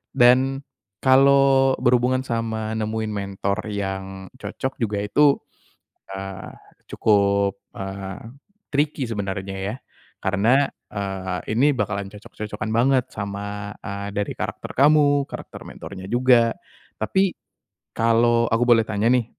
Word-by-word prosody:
Dan 130 +3 +4 0.4
kalau 135 0 +5
berhubungan 125 +1 +2
sama 110 -2 -2
nemuin 110 0 -2
mentor 100 +1 -2
yang 95 -1 -4
cocok 130 0 -5
juga 105 -2 0
itu, 140 +7 +4 0.8
eee, 95 0 -7 0.4
cukup, 100 -2 +2 0.2
eee, 95 0 -6 0.5
tricky 145 -1 0
sebenarnya 95 -3 -4 0.2
ya, - - -7 0.5
karena, 115 +9 +3 0.2
eee, 95 -2 -3 0.2
ini 145 +4 +4
bakalan 100 -2 -2
cocok-cocokan 105 +1 -7
banget 125 +2 +3
sama, 100 0 -5
eee, 100 0 -5
dari 100 0 -1
karakter - - -5
kamu 145 0 +5
karakter - - -9
mentornya 95 -1 -9
juga. 120 -1 +4 0.5
Tapi. 190 - +1 0.6
Kalau 115 +1 +3
aku 115 +2 +2
boleh 120 -2 +6
tanya 105 -1 -1
nih 125 -2 +3
110 Hz, 110 wpm, -23 LUFS, 100-130 Hz, 0.8 s, boleh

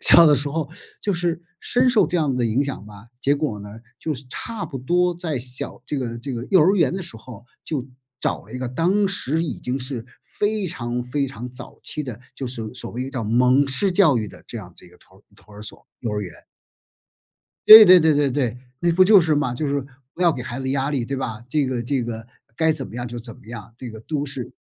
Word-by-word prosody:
小 170 - +8
的 150 - +6
时 145 +1 +4
候 155 0 -3 0.3
就 205 - -1
是 175 -2 -1 0.2
深 250 +1 +2
受 245 -4 +4
这 180 - -1
样 150 -5 +1
的 125 -1 0
影 115 +3 +1
响 140 -7 -5
吧， 105 +1 -13
结 140 +2 +2
果 140 -9 -3
呢， 100 - -9 0.3
就 160 - -2
是 140 -1 -7
差 225 - -5
不 135 - -7
多 175 +7 +1
在 165 -5 -3
小 125 +1 -2
这 150 - -3
个 120 -3 -4
这 135 +3 -6
个 120 0 -5
幼 190 - +6
儿 180 +6 +4
园 165 -8 +2
的 190 - -3
时 165 -10 -2
候 115 0 -12 0.2
就 135 -5 -3 0.3
找 - - -1
了 105 - -15
一 125 - -5
个， 130 -1 -3
当 180 +10 +1
时 165 -4 0
已 160 - -5
经 125 +2 -3
是 130 -3 -5 0.2
非 210 -1 -2
常 125 -7 -3
非 140 +2 -1
常 125 -2 -7
早 125 0 -5
期 150 - 0
的， 125 -6 -7 0.2
就 135 - -6
是 125 - -6
所 110 0 -6
所 125 - -6
谓 125 +2 -4
叫 130 -4 -4
蒙 125 +5 +3
式 190 +8 +4
教 175 -8 +4
育 110 - -3
的 - - -13
这 120 - -7
样 90 -4 -11
子 - - -9
一 - - -15
个 90 - -21
托 95 +2 -23
托 105 +1 -18
儿 105 - -10
所 110 - -6
幼 115 - -3
儿 105 0 -2
园。 95 -4 -6 1.4
对 220 0 +13
对 185 -2 +8
对 160 -1 +4
对 145 -1 +2
对， 125 -3 -1 0.2
那 170 - +2
不 185 +3 +5
就 200 0 +7
是 160 -2 +2
嘛， 145 -4 0
就 150 +5 -2
是 140 0 0 0.3
不 180 - -3
要 170 -2 +5
给 130 -4 -6
孩 120 0 -6
子 130 0 -3
压 135 +1 0
力 135 -5 -1
对 135 +3 -4
吧？ 115 -4 -5
这 145 +1 +1
个 125 -2 -2
这 130 +1 -1
个 115 -1 -6 0.3
该 160 0 +3
怎 145 -4 -2
么 - - -13
样 120 0 -4
就 120 0 -6
怎 115 -1 -5
么 - - -20
样， 115 -1 -9
这 125 -1 -8
个 110 -1 -10
都 145 +5 -3
是 135 -3 -5
135 Hz, 270 characters per minute, -22 LUFS, 120-160 Hz, 1.4 s, 对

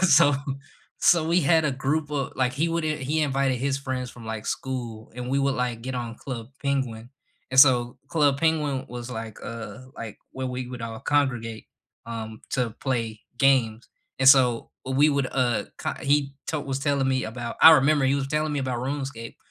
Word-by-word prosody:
so 160 -5 +6 0.6
so 165 -2 +4
we 175 +2 +4
had 160 +1 +3
a 145 - +2
group 145 +3 -1
of 140 -2 -2
like, 125 -1 +1
he 155 +3 0
would 165 -1 -1
i 155 -1 0
he 150 +4 -1
invited 135 -2 +1
his 135 +2 -1
friends 130 -2 -4
from, 115 -2 -12
like, 110 -1 -5
school, 120 -4 -4
and 125 0 -5
we 140 - +2
would, 140 -1 +1
like, 125 -2 -2
get 130 +1 -4
on 120 -2 -4
Club 120 -4 -6
Penguin, 130 -4 -2 0.4
and 130 - +8
so 125 -3 +5
Club 145 -5 +2
Penguin 150 -4 +1
was, 120 0 -7
like, 110 -2 -6
uh 115 +2 -7 0.2
like, 115 -2 -7
where 130 0 -4
we 125 0 -4
would 125 -2 -7
all 115 -1 -5
congregate, 120 -6 -1 0.4
um, 110 -1 -6
to 125 -3 0
play 115 -5 -2 0.2
games, 125 -5 +2 0.3
and 135 0 +6
so 125 -4 +5
we 135 +3 +3
would, 140 -3 +1
uh, 125 -3 +1 0.2
ki - - -1
he 140 0 +2 0.2
to 155 - -1
was 135 -1 -3
telling 140 -2 +1
me 130 -1 +1
about 120 +1 -5
I 160 - +12
remember 145 -1 +4
he 135 - +3
was 135 -1 -2
telling 150 +1 0
me 145 - -1
about 130 -2 -2
Runescape 135 -4 -5
130 Hz, 195 wpm, -25 LUFS, 120-140 Hz, 0.6 s, I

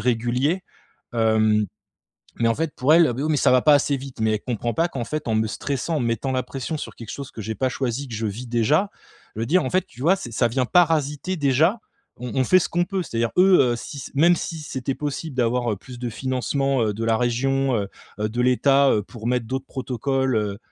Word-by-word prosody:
régulier. 125 - 0 0.5
Hem, 110 -2 +3 0.7
mais 115 - +2
en 115 - +2
fait 160 +2 -3
pour 140 +5 +3
elle 165 -1 +6
«Oh, 120 - -2
beh, 130 - -3
oui, 155 - 0
mais 150 - +2
ça - - +3
va 125 -1 +4
pas 150 -1 +6
assez 140 0 +2
vite». 135 -2 -9
Mais 110 0 +2
elle 105 - -2
comprend 120 -1 -3
pas 165 +1 +1
qu'en 130 -8 -4
fait 150 +1 -4
en 110 - +1
me 110 0 +2
stressant, 140 +8 -3
en - - 0
me 120 - 0
mettant 115 +4 -1
la 130 0 0
pression 135 +5 -5
sur - - -7
quelque 115 - -9
chose 140 -2 -7
que 110 - -8
j'ai 110 +2 -4
pas 130 +3 0
choisi, 130 +1 -3
que 120 - -7
je 110 +1 -2
vis 110 +5 -5
déjà, 120 - +2 0.5
le 115 +2 -3
dire 180 +8 +3
en - - -1
fait, 185 0 +1
tu 120 - -16
vois 170 +8 +4
c'est 120 - -8
ça 120 +2 +2
vient 130 +2 0
parasiter 160 +2 +2
déjà, 155 - +2 0.4
on 125 0 -6
on - - +3
fait 185 - +5
ce - - -1
qu'on 175 +1 +1
peut. 190 0 -2
C'est-à-dire 115 -7 -2
eux, 185 0 +6
heu, 120 -2 +2
si 140 - -8
s 135 - -7
même 170 +5 +5
si 165 0 -5
c'était 135 -2 -4
possible 150 0 -4
d'avoir, 120 -1 +1
heu, - - -3
plus 125 +5 -11
de 125 - -2
financement, 130 +2 -1
heu, 105 -2 0
de 115 +2 -3
la 115 0 +2
région, 135 +2 +1
heu, 100 -2 -2 0.3
heu, 105 - 0
de 120 +3 -3
l'état, 135 +2 +4
heu, 105 - +2
pour 110 +2 -9
mettre 125 -2 0
d'autres 130 +3 -4
protocoles, 130 0 -1
heu, 105 -2 -1
130 Hz, 250 wpm, -23 LUFS, 115-145 Hz, 0.7 s, elle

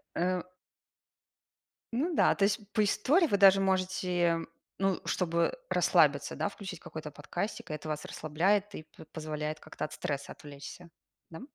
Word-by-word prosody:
Э 180 +1 +1 1.5
Ну 305 +9 0
да, - - +4
то 200 - +2
есть 210 +3 +2
по 215 - +3
истории 285 - +3
вы 200 -9 +1
даже 195 0 +7
можете, 185 -2 +1 0.4
ну, 195 -1 +1
чтобы 170 - 0
расслабиться, - - +3
да, - - 0
включить 190 -5 -8
какой-то 155 -1 -7
подкастик, 165 +8 -5
и - - -3
это 155 +1 -7
вас 150 -1 -3
расслабляет, 195 +7 0
и - - -6
п 160 - -15
позволяет 155 -1 -4
как-то - - -5
от - - -16
стресса 140 -1 -3
отвлечься. 145 +4 -11 0.4
Да? 160 - -9
180 Hz, 150 wpm, -31 LUFS, 155-200 Hz, 1.5 s, даже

